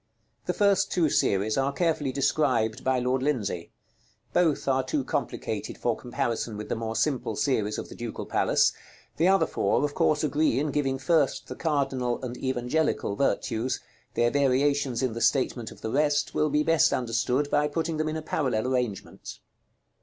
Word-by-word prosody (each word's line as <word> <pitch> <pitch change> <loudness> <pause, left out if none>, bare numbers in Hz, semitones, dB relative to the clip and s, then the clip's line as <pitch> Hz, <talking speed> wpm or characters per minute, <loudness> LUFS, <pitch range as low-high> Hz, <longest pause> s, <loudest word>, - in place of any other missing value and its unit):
The 180 - +1
first 200 -1 +2
two 165 -5 +2
series 105 +5 +1
are 135 +1 +1
carefully 155 -3 0
described 130 -5 +1
by 130 0 +2
Lord 125 +1 0
Lindsay; 105 - -1 0.6
both 165 -6 +2
are 130 -1 +2
too 135 +1 -1
complicated - - -3
for - - 0
comparison 115 -2 -3
with 105 - -7
the - - 0
more 115 0 -4
simple 125 -3 0
series 110 -2 0
of - - -5
the - - -10
Ducal - - -6
Palace; - - +2 0.4
the 165 - +3
other 195 +1 +4
four - - +1
of 145 - -3
course 155 - +2
agree 150 0 +2
in 150 +1 -1
giving 135 -2 0
first 145 +1 +1
the - - -5
cardinal 135 -6 -1
and 125 -1 -5
evangelical 130 -2 -1
virtues; 115 +1 0 0.4
their 120 0 +2
variations 140 -2 +1
in 125 -3 0
the 115 - -5
statement 125 -4 +1
of - - -14
the 110 - -3
rest 145 +2 +1
will 155 - +1
be 150 +1 +2
best 165 -2 +4
understood 125 +4 0
by 150 0 +3
putting 160 +1 -2
them 155 0 0
in 155 - -3
a 155 - -6
parallel 130 -7 -1
arrangement. 125 -6 -4
135 Hz, 175 wpm, -27 LUFS, 120-150 Hz, 0.6 s, other